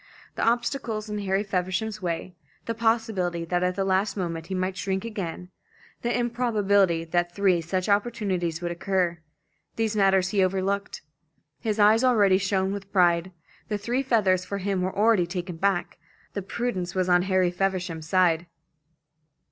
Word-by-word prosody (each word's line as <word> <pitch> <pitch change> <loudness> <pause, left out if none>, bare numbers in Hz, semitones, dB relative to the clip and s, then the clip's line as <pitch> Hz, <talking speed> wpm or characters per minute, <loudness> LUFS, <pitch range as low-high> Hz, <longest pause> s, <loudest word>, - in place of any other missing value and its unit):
The - - -3
obstacles 235 -2 -1
in 210 - -2
Harry 195 0 0
Feversham's 190 +2 -2
way, 175 0 -3 0.3
the 230 - -2
possibility 220 -7 0
that 175 +1 0
at 180 0 0
the 195 0 -1
last 195 +2 +1
moment 165 -3 -3
he 190 - -3
might 185 +1 -1
shrink 190 0 -2
again, 185 -5 -5 0.5
the 240 +1 0
improbability 205 -8 +2
that 175 +1 -1
three 190 -4 +3
such 180 +2 -2
opportunities 200 -6 0
would 175 - -1
occur 180 -1 -1 0.6
these 225 -1 -1
matters 195 -2 +3
he 195 -1 +2
overlooked. 195 0 -1 0.6
His 220 -2 -2
eyes 215 +3 +5
already 205 -7 +4
shone 190 -1 0
with 200 -1 -7
pride; 175 -1 +3 0.4
the 210 - -1
three 235 +6 -1
feathers 205 -8 +2
for 200 +2 -4
him 195 -1 -1
were 185 +1 -2
already 210 -4 +4
taken 180 -1 -5
back. 195 0 0 0.3
The 200 - -3
prudence 195 -3 -3
was 185 -1 +1
on 180 -1 +4
Harry 185 -1 +2
Feversham's 180 -4 -2
side. 175 -2 +3
190 Hz, 155 wpm, -26 LUFS, 180-210 Hz, 0.6 s, eyes